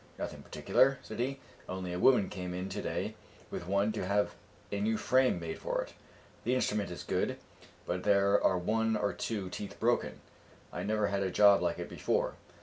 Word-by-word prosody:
"Nothing -, -, -5 dB
particular," 135 Hz, 0 st, +2 dB
said 110 Hz, -, -8 dB
he; 135 Hz, +3 st, -1 dB, 0.3 s
"only 90 Hz, -1 st, -4 dB
a 90 Hz, -, -3 dB
woman 125 Hz, -2 st, +5 dB
came 90 Hz, -2 st, -5 dB
in 90 Hz, +1 st, -3 dB
to -, -, -4 dB
day -, -, -2 dB, 0.4 s
with 85 Hz, -, -5 dB
one 100 Hz, +3 st, +2 dB
to 110 Hz, -, -3 dB
have 100 Hz, +2 st, +1 dB, 0.4 s
a 100 Hz, -, -1 dB
new 110 Hz, +1 st, +1 dB
frame 130 Hz, -6 st, +3 dB
made 80 Hz, -1 st, -5 dB
for -, -, -1 dB
it. -, -, -13 dB, 0.5 s
The 125 Hz, +3 st, +1 dB
instrument 105 Hz, -5 st, 0 dB
is 90 Hz, -, -6 dB
good, -, -, -1 dB, 0.5 s
but 90 Hz, +1 st, -2 dB
there 100 Hz, 0 st, +4 dB
are 95 Hz, -, +4 dB
one 110 Hz, +4 st, +1 dB
or 105 Hz, -1 st, 0 dB
two 105 Hz, -5 st, -3 dB
teeth 100 Hz, +3 st, -6 dB
broken; -, -, +1 dB, 0.5 s
I -, -, -3 dB
never 105 Hz, 0 st, +1 dB
had 100 Hz, 0 st, 0 dB
a 95 Hz, -, 0 dB
job 100 Hz, 0 st, +6 dB
like 90 Hz, -1 st, 0 dB
it -, -, -5 dB
before." -, -, 0 dB
100 Hz, 195 wpm, -32 LUFS, 90-110 Hz, 0.5 s, job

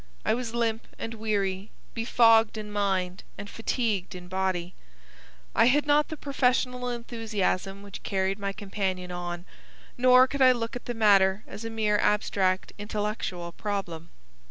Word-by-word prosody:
I -, -, +3 dB
was 235 Hz, -1 st, -3 dB
limp 230 Hz, -1 st, -1 dB
and 225 Hz, -, -5 dB
weary, 205 Hz, -3 st, -2 dB, 0.2 s
befogged 225 Hz, -1 st, +4 dB
in 210 Hz, -1 st, -6 dB
mind 190 Hz, -3 st, -1 dB
and 200 Hz, -, -7 dB
fatigued 220 Hz, -4 st, -2 dB
in 180 Hz, 0 st, -9 dB
body. 185 Hz, -2 st, -1 dB, 0.8 s
I -, -, +5 dB
had 290 Hz, +5 st, +4 dB
not 295 Hz, +1 st, +3 dB
the 315 Hz, -, -6 dB
professional 250 Hz, -3 st, 0 dB
enthusiasm 215 Hz, -5 st, -2 dB
which 200 Hz, -1 st, -9 dB
carried 195 Hz, 0 st, -1 dB
my 200 Hz, 0 st, -2 dB
companion 195 Hz, -3 st, -3 dB
on, 175 Hz, 0 st, -5 dB, 0.5 s
nor 255 Hz, 0 st, +7 dB
could 280 Hz, +1 st, -4 dB
I 255 Hz, -1 st, +8 dB
look 230 Hz, -1 st, -4 dB
at 245 Hz, -, -7 dB
the 240 Hz, -, -4 dB
matter 200 Hz, -2 st, +4 dB
as 205 Hz, +3 st, -9 dB
a -, -, -3 dB
mere 215 Hz, -2 st, +1 dB
abstract 190 Hz, -3 st, +1 dB
intellectual 205 Hz, -4 st, -3 dB
problem. 175 Hz, -5 st, -4 dB
210 Hz, 150 wpm, -27 LUFS, 190-230 Hz, 0.8 s, I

